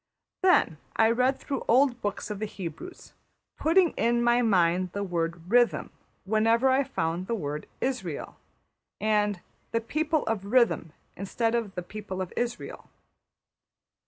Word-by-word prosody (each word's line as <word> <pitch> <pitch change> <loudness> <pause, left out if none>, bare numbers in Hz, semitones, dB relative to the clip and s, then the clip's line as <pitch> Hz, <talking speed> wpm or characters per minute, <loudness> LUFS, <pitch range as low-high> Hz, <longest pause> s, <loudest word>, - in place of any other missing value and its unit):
'' - - -63
Then 360 - +3 0.2
I 225 0 +4
read 255 +3 +2
through 275 -3 -4
old 245 0 +3
books 205 +1 -3
of 205 - -5
the 215 - -2
Hebrews, 195 - -8 0.4
putting 335 +2 +3
in 235 +1 +1
my 240 +1 +4
mind 180 -4 +2
the 200 - -2
word 170 -2 -2
``rhythm'' 240 0 +2 0.3
wherever 225 +5 +3
I 265 +2 +3
found 170 -5 -2
the 230 - 0
word 150 -6 -4 0.2
``Israël,'' 220 - -3 0.7
and 210 -3 +1 0.3
``the 230 0 -2
people 310 +2 0
of 215 -3 -2
rhythm'' 215 -8 +2 0.2
instead 225 +4 -1
of 230 -5 -2
``the 180 -1 -5
people 205 -3 -6
of 185 -1 -4
Israël.'' 240 0 -4
220 Hz, 145 wpm, -27 LUFS, 185-245 Hz, 0.7 s, I